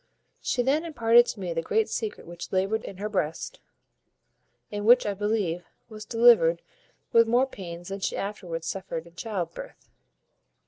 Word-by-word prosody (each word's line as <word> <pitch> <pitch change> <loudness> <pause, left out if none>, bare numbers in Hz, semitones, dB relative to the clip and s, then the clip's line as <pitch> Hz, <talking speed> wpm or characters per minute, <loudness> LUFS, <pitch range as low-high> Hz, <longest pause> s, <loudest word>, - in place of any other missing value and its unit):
She 245 - 0
then 285 +5 +2
imparted 240 -7 +4
to 215 - -5
me 180 -3 -3
the 165 - -1
great 440 - +1
secret 435 -2 -4
which 175 0 -9
laboured 195 +4 0
in 190 - -8
her 205 +2 -3
breast, 165 -7 -3 1.1
and 205 0 -3
which, 245 +3 +6
I 205 - 0
believe, 200 -4 -1 0.3
was 215 -1 -9
delivered 225 -9 +5 0.5
with 230 0 +5
more 245 +3 +4
pains 175 -8 -9
than 195 +1 -4
she - - -2
afterwards 180 -5 -4
suffered 175 -4 -4
in 170 - -16
child 180 -3 -4
birth. - - -11
205 Hz, 165 wpm, -27 LUFS, 175-230 Hz, 1.1 s, which